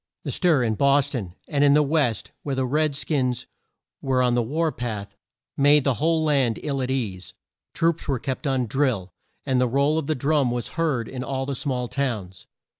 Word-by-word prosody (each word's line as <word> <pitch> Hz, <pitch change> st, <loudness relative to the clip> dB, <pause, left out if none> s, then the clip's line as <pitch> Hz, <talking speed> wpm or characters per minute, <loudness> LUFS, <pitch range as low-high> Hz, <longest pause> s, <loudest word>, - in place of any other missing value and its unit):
The -, -, -3 dB
stir 165 Hz, -8 st, +3 dB
in 110 Hz, -2 st, +1 dB
Bos 140 Hz, +3 st, +3 dB
ton, 95 Hz, -10 st, -5 dB
and 145 Hz, -1 st, +1 dB
in 140 Hz, 0 st, +6 dB
the 150 Hz, -, +5 dB
West 140 Hz, -7 st, 0 dB
where 140 Hz, -2 st, -3 dB
the 130 Hz, 0 st, 0 dB
red 150 Hz, +2 st, +1 dB
skins 130 Hz, -4 st, -1 dB, 0.6 s
were 130 Hz, -2 st, +1 dB
on 125 Hz, -1 st, +2 dB
the 120 Hz, -, +2 dB
war 155 Hz, +7 st, 0 dB
path, 105 Hz, -6 st, -5 dB, 0.4 s
made 145 Hz, +1 st, +5 dB
the 135 Hz, -, +2 dB
whole 160 Hz, 0 st, +2 dB
land 135 Hz, -7 st, +2 dB
ill 140 Hz, -3 st, -1 dB
at 130 Hz, -, -2 dB
ease. 105 Hz, -9 st, -3 dB, 0.4 s
Troops 165 Hz, 0 st, +1 dB
were 135 Hz, -3 st, +1 dB
kept 130 Hz, +5 st, -4 dB
on 130 Hz, -2 st, +1 dB
drill, 115 Hz, -, -1 dB, 0.3 s
and 130 Hz, -2 st, +2 dB
the 125 Hz, -, +3 dB
roll 140 Hz, +5 st, +2 dB
of 150 Hz, -, -5 dB
the 155 Hz, -, +1 dB
drum 140 Hz, 0 st, +1 dB
was 120 Hz, -1 st, -3 dB
heard 150 Hz, -9 st, -1 dB
in 130 Hz, -1 st, -5 dB
all 135 Hz, 0 st, -3 dB
the 140 Hz, -, -3 dB
small 125 Hz, -2 st, -2 dB
towns. 110 Hz, -10 st, -3 dB
135 Hz, 200 wpm, -24 LUFS, 120-145 Hz, 0.6 s, in